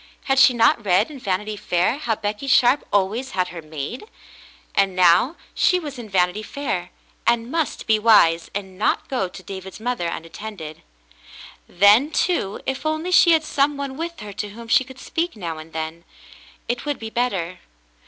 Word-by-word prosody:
Had 270 -1 +2
she 265 - +8
not 230 -1 +3
read 200 +7 +2
in 280 - -9
Vanity 210 0 -2
Fair 185 +6 0
how 235 -7 -1
Becky 210 +5 -4
Sharp 255 +1 +4
always 205 +6 0
had 180 -1 +1
her 170 -1 -8
maid? 155 - -6 0.7
And 195 -2 +2
now 180 - +4 0.2
she 365 - +3
was 290 -6 -7
in 225 -3 -8
"Vanity 180 +1 +1
Fair," 215 -7 -4 0.4
and 235 +1 +1
must 325 -3 -2
be 220 -1 +3
wise 170 -7 +4
and 190 -2 -6
not - - +1
go 250 -8 -1
to 185 +1 -12
David's 190 +1 -8
mother 235 -6 -2
unattended. 165 -1 -7 0.9
Then, 205 +10 +5
too, 320 - -1
if 265 0 -3
only 315 +3 -2
she 345 -1 +6
had 320 -1 +3
some 285 -1 +1
one 280 -1 -4
with 335 +3 -5
her 205 -1 -8
to 205 - -4
whom 230 +3 -11
she 245 - +4
could 260 0 -13
speak 335 +4 -3
now 170 -6 -5
and 155 +1 -11
then, 160 +1 -5 0.6
it 240 0 -2
would 290 -1 -2
be 220 0 -7
better. 190 -8 -2
215 Hz, 180 wpm, -22 LUFS, 185-265 Hz, 0.9 s, she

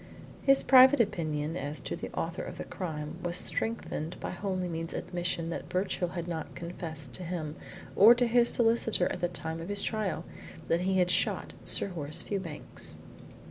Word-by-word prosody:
His 275 0 +4
private 260 +1 +8
opinion 160 -7 0
as 145 -2 -3
to - - -4
the - - -6
author 165 +1 -2
of - - -7
the - - -4
crime 150 -5 -5
was 175 0 0
strengthened 185 -6 -2
by - - -4
Holymead's 180 -3 -3
admission 175 -2 -2
that 170 - -5
Birchill 185 -1 0
had 170 -2 -4
not 160 -3 -5
confessed 165 -5 -7
to 185 - -4
him 165 -3 -4 0.4
or 225 +4 +9
to 245 +1 +3
his 235 0 +4
solicitor 225 -5 +3
at - - -4
the 175 - +1
time 165 -1 -4
of 170 - -7
his 205 0 0
trial 215 -4 -1 0.4
that 165 - +3
he 190 +1 +1
had 180 -1 +3
shot 180 - 0
Sir - - +2
Horace 160 -2 -2
Fewbanks. 190 -7 -4
175 Hz, 175 wpm, -30 LUFS, 165-200 Hz, 0.4 s, or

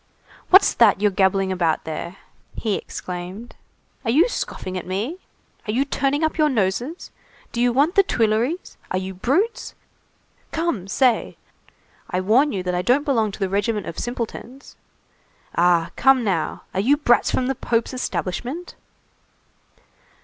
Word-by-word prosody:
"What's 380 +2 +7
that 215 -5 +5
you 210 0 +3
are - - -8
gabbling 190 0 +2
about 170 -4 0
there?" 160 +3 -5 0.4
he 220 -3 -1
exclaimed. 185 +5 -6 0.5
"Are 230 - -2
you 300 - +5
scoffing 185 - -4
at 180 - -5
me? 220 - -3 0.5
Are - - 0
you 260 +6 +1
turning 280 +2 0
up 315 +1 -1
your 305 -1 +4
noses? 240 - -2 0.4
Do 235 - -2
you 245 0 +3
want 285 +8 +2
the 400 - +6
Tuileries? 235 - 0
Are 185 - -1
you 190 +1 -4
brutes? 305 - -1 0.8
Come, 320 - -2
say! 245 +3 +1 0.7
I 180 - -1
warn 240 +10 +3
you 190 -2 -3
that 180 0 -2
I 180 - 0
don't 255 +9 +2
belong 225 -7 +1
to - - -9
the 195 - 0
regiment 205 +2 -1
of - - -6
simpletons. 245 +2 -6 0.8
Ah, 170 -1 +3
come 265 -2 +4
now, 185 -7 -1
are 190 - -1
you 265 +9 +3
brats 240 -5 +3
from 255 - 0
the 270 - 0
Pope's 235 -1 -1
establishment?" 255 - -4
230 Hz, 155 wpm, -22 LUFS, 190-275 Hz, 0.8 s, What's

